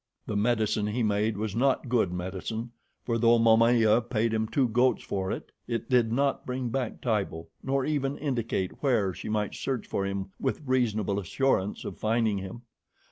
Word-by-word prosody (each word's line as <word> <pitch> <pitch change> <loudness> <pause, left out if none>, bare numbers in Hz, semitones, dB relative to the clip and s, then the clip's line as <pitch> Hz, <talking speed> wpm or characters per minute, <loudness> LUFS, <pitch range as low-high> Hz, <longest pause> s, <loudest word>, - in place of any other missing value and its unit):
The 105 - -3
medicine 110 -1 +1
he 115 +3 -1
made 105 0 +1
was 105 -1 -3
not 130 +2 +2
good 120 -7 +2
medicine, 95 +6 -4 0.3
for 115 -1 0
though 115 +1 +5
Momaya 115 0 +5
paid 115 -1 0
him 110 0 0
two 130 +2 +2
goats 125 +3 +2
for 95 -1 -2
it, - - -5 0.2
it 115 0 -3
did 120 -3 +4
not 135 +3 +1
bring 125 -1 -3
back 125 -1 -3
Tibo, 100 -8 -2
nor 135 0 0
even 145 -2 -1
indicate 115 -9 -2
where 115 -9 +2
she - - -7
might 105 -1 -1
search 130 -4 -3
for 100 - -2
him 100 0 -4
with 130 - -1
reasonable 110 -6 +1
assurance 100 0 0
of - - -6
finding 110 -2 +1
him. 95 +5 -8
115 Hz, 175 wpm, -28 LUFS, 105-125 Hz, 0.3 s, though